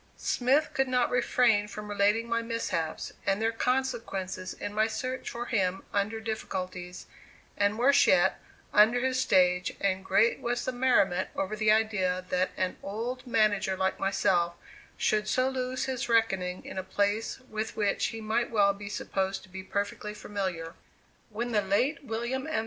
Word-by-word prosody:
Smith 265 +5 +1
could 270 0 +1
not 250 -1 +1
refrain 240 -3 +3
from 210 0 -7
relating 205 +3 +2
my 230 0 0
mishaps 230 -9 -3
and 195 0 +1
their 225 +1 +1
consequences 225 -7 -2
in 205 - -6
my 215 +1 +2
search 255 +4 -4
for 240 +1 -5
him 190 -5 0
under 205 +2 0
difficulties, 185 -5 -5 0.5
and 205 +1 +1
worse 275 +4 +5
yet, 185 +1 +4 0.3
under 220 +4 +6
his 260 0 +1
stage, 180 -4 +3
and 190 -1 0
great 210 +5 +3
was 240 0 -2
the - - 0
merriment 245 -8 +2
over 195 +2 -2
the 215 0 +1
idea 190 -5 +1
that 180 0 +1
an 185 -1 -1
old 240 +6 -4
manager 205 -5 +2
like 190 0 0
myself 175 -3 +1 0.4
should 215 -1 +1
so 255 +3 +2
lose 255 -1 -2
his 260 0 -3
reckoning 190 -6 +1
in - - -5
a - - -4
place 205 +5 -1
with 215 0 -3
which 205 -2 +1
he 225 - -6
might 220 +2 0
well 200 -3 +3
be 200 0 -8
supposed 195 -1 -2
to 190 - -16
be 190 +1 -7
perfectly 200 +2 -3
familiar. 185 -6 -4 0.6
When 235 +3 -3
the 210 -2 +3
late 255 +10 0
William 245 +3 -3
M. 315 - 0
210 Hz, 165 wpm, -29 LUFS, 190-240 Hz, 0.6 s, under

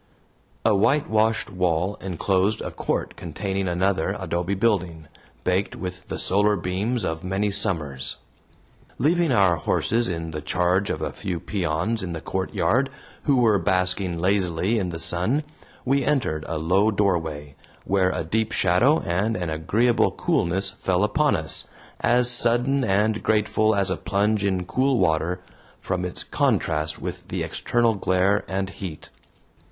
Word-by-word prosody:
A 110 - +5
whitewashed 110 -2 +2
wall 90 0 0
enclosed 95 +3 0
a - - -5
court - - -3
containing 95 +3 -3
another 90 -1 0
adobe 90 +3 -2
building, 90 -7 0 0.4
baked 95 +2 0
with 90 0 -7
the - - -4
solar 105 +2 +2
beams 100 +7 -2
of 80 0 -3
many 95 +3 -1
summers. 75 -9 -1 0.8
Leaving 170 +1 +2
our 95 -7 +4
horses 115 +8 0
in 80 -2 -4
the 75 -1 -5
charge 90 +4 +1
of - - -2
a - - -2
few 90 -3 -4
peons 95 +4 -1
in 90 -2 -4
the 80 - -4
courtyard, 115 - 0 0.4
who 140 - +3
were 115 -5 +4
basking 90 0 0
lazily 95 +3 +1
in 95 -3 -2
the 85 - -5
sun, 90 - 0 0.4
we 135 +1 +2
entered 120 - 0
a 80 - -3
low 95 +7 +2
doorway, 80 -9 -1 0.3
where 95 -1 +2
a - - -2
deep 110 +7 -1
shadow 115 - +3
and 100 +5 0
an 90 -4 -3
agreeable 110 +10 +2
coolness 95 +3 0
fell 95 0 0
upon 150 +8 +2
us, 80 -1 0 0.3
as 120 +1 +3
sudden 120 +3 +3
and 105 +1 +1
grateful 110 0 +2
as 100 -2 +1
a 95 - -1
plunge 100 +1 0
in 95 -2 0
cool 130 +6 +1
water, 90 0 +1 0.4
from 90 -1 -2
its 90 -1 -3
contrast 75 0 0
with - - -6
the - - -3
external 120 -1 +1
glare 95 0 +1
and 95 0 -2
heat. 90 -6 -8
95 Hz, 145 wpm, -24 LUFS, 90-110 Hz, 0.8 s, A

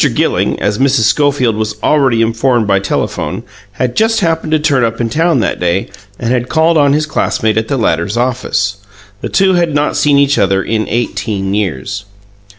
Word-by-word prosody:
Gilling, - - 0
as 105 +2 -1
Mrs. 135 -4 +2
Schofield 130 0 +2
was 110 -1 -3
already 130 -7 +2
informed 115 +1 +1
by 100 -1 +2
telephone, 100 - -3 0.3
had 125 +4 -2
just 225 0 +2
happened 165 -3 -1
to 155 - +4
turn 145 -4 +1
up 115 -1 -1
in 115 -1 -2
town 160 -2 +2
that 95 - -2
day, 90 +3 -1 0.3
and 120 0 -2
had 125 0 -1
called 160 +1 +2
on 145 -2 +3
his 155 +1 +1
classmate 110 -7 -1
at 110 0 -1
the 140 - -1
latter's 90 -1 0
office. 120 -5 -1 0.4
The - - -4
two 190 -1 +2
had 170 -4 +1
not 145 0 0
seen 145 -1 +3
each 140 0 +2
other 95 -1 +1
in 110 -1 -2
eighteen 105 -4 -2
years. 100 0 -3
120 Hz, 185 wpm, -13 LUFS, 105-145 Hz, 0.4 s, to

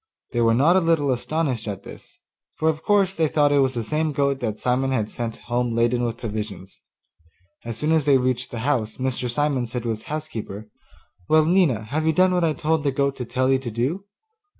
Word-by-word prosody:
They 120 - 0
were 115 -1 +4
not 150 +8 +4
a - - +6
little 165 -5 +2
astonished 130 -2 -1
at 100 -2 -5
this, - - -12 0.4
for 160 - +1
of 155 0 -2
course 195 -1 +2
they 160 -1 +2
thought 145 -1 +2
it 145 - +4
was 135 -1 +2
the 115 - -2
same 155 +5 -1
goat 140 -1 +1
that 110 -4 -3
Simon 130 +2 0
had 110 -5 -1
sent 115 -2 -4
home 120 -1 -1
laden 120 +1 +2
with 120 -1 -2
provisions. 105 -4 -6 0.8
As 115 -1 -4
soon 150 +4 0
as 160 -3 +2
they 140 -2 +5
reached 130 0 -1
the 115 - -5
house 115 -7 0
Mr. 130 -1 -2
Simon 135 -1 0
said 120 +1 -4
to 120 - -2
his 110 -1 -3
housekeeper, 115 -9 -6 0.6
'Well, 155 0 +5
Nina, 165 - +3
have 150 +8 -2
you 160 - +3
done 185 +3 +4
what 180 -1 +1
I 160 -2 +2
told 160 0 0
the 140 - +1
goat 140 0 0
to 125 - -4
tell 130 +2 0
you 135 - +3
to 130 -2 -5
do? 130 - -2
130 Hz, 220 wpm, -23 LUFS, 115-155 Hz, 0.8 s, a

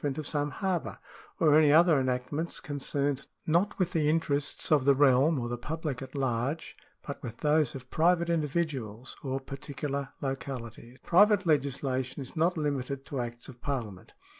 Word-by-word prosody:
ment 140 -2 -1
of 155 - -4
some 145 0 -1
harbour, 185 +1 -2 0.4
or 155 -3 +5
any 155 -2 +6
other 160 -1 +6
enactments 130 +6 -2
concerned, 140 -1 -2
> - - -45
not 195 +5 +2
with 180 -2 0
the 150 -2 +2
interests 145 -3 -1
of 150 -4 +5
the 140 0 +5
realm 140 +2 +4
or 120 - -3
the 120 0 -4
public 150 -1 -4
at 135 +1 -9
large, 135 +3 -1 0.3
fi, 140 - -4
but - - -24
with 120 -4 -7
those 150 -3 +2
of 130 -1 -10
private 170 +1 +3
individuals 150 -8 -2
or 135 -1 -2
particular 140 +1 -5
localities.^ 125 -3 -5
f» - - -23
Private 205 +2 +5
legislation 135 -3 0
is 135 +2 -8
not 170 +2 +2
limited 140 -2 -2
to 140 - -4
acts 120 0 -5
of 125 -3 -12
Parliament. 115 -10 -4
140 Hz, 175 wpm, -29 LUFS, 130-155 Hz, 0.4 s, any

